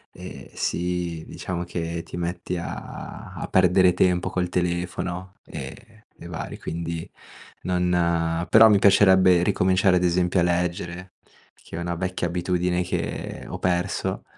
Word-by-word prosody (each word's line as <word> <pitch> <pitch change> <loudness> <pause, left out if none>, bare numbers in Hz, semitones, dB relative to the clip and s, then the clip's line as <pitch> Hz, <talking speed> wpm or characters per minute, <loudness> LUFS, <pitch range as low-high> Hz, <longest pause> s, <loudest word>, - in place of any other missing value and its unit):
e - - -10
sì, 85 -2 -2
diciamo 85 -1 -4
che 85 -1 -4
ti 85 - -8
metti 90 +1 -3
a 85 - -7
a - - -5
perdere 90 0 +4
tempo 90 -1 +2
col 90 -1 -1
telefono 90 +1 -2
e 110 -1 -9 0.2
e - - -8
vari, 85 -1 -6
quindi 85 0 -5 0.5
non 85 -2 +1
però 110 0 +8
mi 105 - +5
piacerebbe 95 -3 +6
ricominciare 95 +1 +3
ad 90 - 0
esempio 90 +1 +2
a - - +3
leggere, 90 +1 -2 0.4
che - - -12
è - - -3
una 85 0 -2
vecchia 90 0 -2
abitudine 90 +1 0
che 90 - -4
ho - - -5
perso. 90 +1 -1
90 Hz, 140 wpm, -24 LUFS, 85-90 Hz, 0.5 s, però